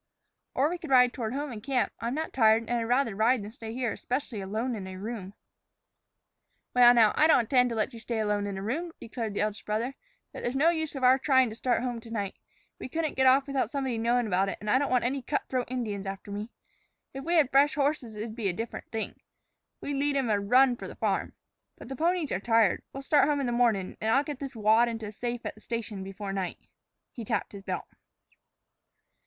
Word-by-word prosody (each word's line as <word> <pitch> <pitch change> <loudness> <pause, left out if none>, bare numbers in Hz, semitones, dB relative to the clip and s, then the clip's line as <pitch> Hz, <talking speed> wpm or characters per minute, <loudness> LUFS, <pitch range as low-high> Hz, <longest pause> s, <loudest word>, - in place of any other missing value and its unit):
"Or 270 +3 +3
we 350 +2 -3
could 330 -4 -8
ride 250 -2 +5
toward 230 0 -3
home 290 0 -3
and 220 -3 -7
camp. 265 +2 0
I'm 235 +3 -2
not 315 +1 -3
tired, 225 -2 +4
and 230 - -8
I'd 230 - -2
rather 245 -2 +1
ride 225 +2 +2
than 205 - -8
stay 225 -2 -8
here, 245 0 -1
especially 250 -4 -3
alone 220 +6 -2
in 195 -3 -6
a 190 - -7
room." 205 -1 -6 1.4
"Well, 245 -1 +8
now, 225 -3 +5
I 310 - +5
don't 280 -5 +6
intend 250 +2 +3
to 230 - -3
let 220 +3 -1
you 230 - -8
stay 230 +1 -3
alone 210 -1 0
in 200 -1 -4
a 190 - -5
room," 325 +10 -3
declared 225 -3 -5
the - - 0
eldest 210 0 -2
brother. 225 +5 -2 0.4
"But - - -7
there's 240 +2 -2
no 300 +5 +4
use 315 -3 -3
of 270 - -5
our 255 +1 +6
tryin' 260 -3 +4
to - - -7
start 245 0 0
home 245 -2 -2
to 230 0 -13
night. 205 -4 -3 0.5
We - - -6
couldn't 320 +1 -1
get 265 0 +3
off 265 +1 +5
without 275 -5 -1
somebody 265 -5 -2
knowin' 240 +1 +2
about 195 -1 +1
it, - - -4
and 210 0 -2
I 260 - +5
don't 285 - 0
want 250 -1 +2
any 265 +3 -1
cutthroat 255 -2 -2
Indians 215 -6 -3
after 195 +1 -6
me. 205 +3 -5 0.6
If 270 0 -6
we 340 +3 0
had 295 -6 +4
fresh 280 +2 +4
horses 280 -6 -1
it'd 215 +1 -5
be 225 -4 -2
a - - -1
different 225 +5 -6
thing. 225 -1 -4 0.6
We'd 285 -1 -3
lead 285 +1 +1
'em 255 -5 0
a 205 - +2
run 245 +5 +4
for - - -7
the - - -9
farm. - - -1 0.4
But - - -11
the 270 - -4
ponies 335 +1 0
are 185 - 0
tired. 225 -2 +3
We'll 275 - -7
start 290 0 +4
home 290 -1 +1
in 275 - -1
the 240 - -1
mornin', 230 -6 +1
and 220 - 0
I'll 275 +5 +4
get 290 -3 -6
this 275 -2 -6
wad 220 +2 +4
into 225 -1 -5
a 210 - -6
safe 240 +2 -4
at - - -3
the 215 - -19
station 220 -4 -4
before 195 +1 -6
night." 190 -2 -3 0.5
He 235 - -7
tapped 215 -2 -2
his 200 - -9
belt. - - -4
240 Hz, 240 wpm, -28 LUFS, 215-270 Hz, 1.4 s, Well